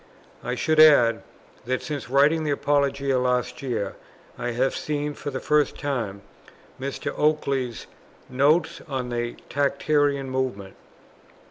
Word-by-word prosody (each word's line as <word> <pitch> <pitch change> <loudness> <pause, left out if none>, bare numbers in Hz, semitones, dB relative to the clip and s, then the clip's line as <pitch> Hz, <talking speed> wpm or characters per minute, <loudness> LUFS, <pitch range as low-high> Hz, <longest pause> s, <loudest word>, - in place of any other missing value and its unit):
I 125 - -2
should 155 +4 +1
add 120 -7 +6 0.4
that, 130 +1 -2
since 145 -5 -5
writing 145 +4 +3
the 155 - -2
Apologia 140 -2 +1
last 125 -1 -1
year, 120 -7 -3 0.4
I 120 - -3
have 125 +3 0
seen 150 -1 -2
for 145 - -6
the 130 -2 -4
first 150 0 +1
time 115 -9 -3 0.6
Mr. 135 +1 -4
Oakeley's 140 -5 0 0.4
"Notes 150 +6 +2
on 130 -4 -3
the 120 0 -3
Tractarian 140 0 +1
Movement." 130 -7 -3
135 Hz, 125 wpm, -24 LUFS, 125-145 Hz, 0.6 s, add